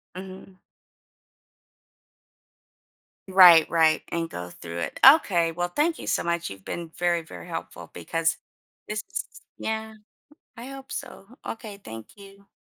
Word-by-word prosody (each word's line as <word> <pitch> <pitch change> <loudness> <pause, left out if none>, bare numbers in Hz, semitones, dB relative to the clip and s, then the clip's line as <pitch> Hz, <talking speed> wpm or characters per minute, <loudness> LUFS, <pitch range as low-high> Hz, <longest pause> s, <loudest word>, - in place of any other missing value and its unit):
Mhm. 190 0 -10 2.7
Right, 180 -4 +8
right, 160 -1 +3
and 165 -1 -2
go 90 0 -7
through 85 0 -8
it. - - -4
Okay, 175 - +6
well 175 +1 -2
thank 310 - 0
you - - -8
so - - +1
much. 170 -4 -2
You've 95 -1 -11
been 170 -2 -6
very, 175 -1 +1
very 90 - -11
helpful - - -7
because 165 - -1 0.5
this 210 +1 -3
is - - -2 0.3
Yeah, 220 0 -4 0.6
I 240 +3 -8
hope 270 0 -10
so. 250 -7 -7 0.2
Okay, 220 -3 -7
thank 110 0 -9
you. 200 0 -15
175 Hz, 135 wpm, -25 LUFS, 165-210 Hz, 2.7 s, Right